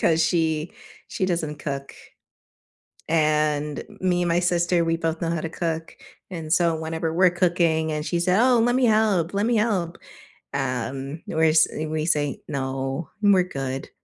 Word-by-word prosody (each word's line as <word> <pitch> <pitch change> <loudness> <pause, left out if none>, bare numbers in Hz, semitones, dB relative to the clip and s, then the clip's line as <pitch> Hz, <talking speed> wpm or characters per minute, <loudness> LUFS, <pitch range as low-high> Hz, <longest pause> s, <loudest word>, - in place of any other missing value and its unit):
'cause 165 -1 +3
she 160 -1 0 0.4
she 185 - -2
doesn't 155 -4 -2
cook. 140 -1 -5 1.1
And 150 -2 +1 0.2
me 180 -1 +1
and 175 - 0
my 170 +1 +2
sister, 175 -1 +1
we 165 0 +1
both 165 -1 -2
know 165 - 0
how 170 -2 -1
to 165 - -3
cook, 165 -1 -4 0.3
and 160 -3 -5
so 170 -2 +3
whenever 160 0 -3
we're 180 +1 +4
cooking, 170 -3 +1
and 150 0 -3
she 170 +1 -1
said, 180 +3 +2
"Oh, 250 -1 +4
let 240 +2 +2
me 260 -1 +2
help, 215 -6 +2
let 200 +2 0
me 235 -1 +2
help." 195 -6 0 0.6
Um, 135 +2 -3
we're 160 0 +2
sa 160 - +5 0.2
we 155 0 -2
say 145 -4 0
"No, 135 +2 -3
we're 200 -3 +5
good." 135 -5 -5
165 Hz, 165 wpm, -24 LUFS, 150-180 Hz, 1.1 s, sa